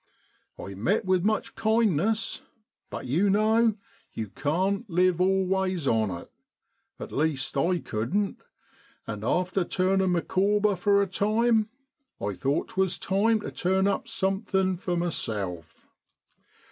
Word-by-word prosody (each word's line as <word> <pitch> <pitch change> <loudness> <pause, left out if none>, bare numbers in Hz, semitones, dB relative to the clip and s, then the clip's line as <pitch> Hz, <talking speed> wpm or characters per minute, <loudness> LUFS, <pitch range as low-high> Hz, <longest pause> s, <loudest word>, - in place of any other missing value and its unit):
I 100 - -7
met 175 - 0
with 185 -2 +2
much 215 +1 0
kindness, 220 -1 +1 0.5
but, - - -6
you 165 +11 +2
know, 220 +2 +3 0.4
you 110 -3 -4
can't 190 - -1
live 180 0 +2
always 190 -3 +1
on 110 -3 +2
it 85 -2 -7 0.7
at - - -7
least, 140 -3 -1
I 170 +6 +2
couldn't 170 - -2 0.6
and 105 0 -6
after 180 - +1
turning 190 +1 +1
Micawber 200 +4 +1
for 200 +2 +3
a - - -2
time, 215 +3 +2 0.5
I 100 - -2
thought 135 +11 -1
'twas 190 -1 0
time 215 +3 +1
to - - -6
turn 190 +2 +1
up 200 -1 0
something 190 -3 0
for 175 0 -3
myself. 100 - -3
190 Hz, 125 wpm, -27 LUFS, 160-205 Hz, 0.7 s, know